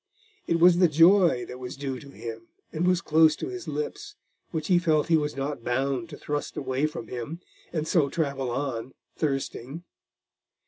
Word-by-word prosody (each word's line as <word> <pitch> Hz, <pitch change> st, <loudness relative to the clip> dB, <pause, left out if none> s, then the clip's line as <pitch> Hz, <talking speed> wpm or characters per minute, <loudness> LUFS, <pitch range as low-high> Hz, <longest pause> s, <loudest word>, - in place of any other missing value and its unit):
It 170 Hz, -, +2 dB
was 175 Hz, +1 st, +6 dB
the 180 Hz, -, +6 dB
joy 165 Hz, -3 st, +5 dB
that 125 Hz, -, -9 dB
was 125 Hz, 0 st, -7 dB
due 135 Hz, -2 st, -4 dB
to 140 Hz, -, -12 dB
him 115 Hz, -3 st, -8 dB, 0.3 s
and 165 Hz, +3 st, 0 dB
was 180 Hz, -1 st, +3 dB
close 155 Hz, 0 st, +5 dB
to 350 Hz, -, -5 dB
his 370 Hz, -1 st, -7 dB
lips, 415 Hz, -2 st, -4 dB, 0.3 s
which 160 Hz, -2 st, -3 dB
he 180 Hz, +1 st, +4 dB
felt 160 Hz, -3 st, +2 dB
he 165 Hz, -, +5 dB
was 150 Hz, -1 st, 0 dB
not 140 Hz, -2 st, -3 dB
bound 135 Hz, +6 st, -1 dB
to 145 Hz, -, -9 dB
thrust 145 Hz, 0 st, -4 dB
away 135 Hz, +2 st, 0 dB
from 120 Hz, -7 st, -7 dB
him 125 Hz, +7 st, -5 dB, 0.3 s
and 155 Hz, -2 st, -2 dB
so 155 Hz, -5 st, +3 dB
travel 140 Hz, -5 st, -1 dB
on, 130 Hz, -1 st, -3 dB, 0.2 s
thirsting. 135 Hz, +1 st, -3 dB
150 Hz, 180 wpm, -27 LUFS, 135-170 Hz, 0.3 s, was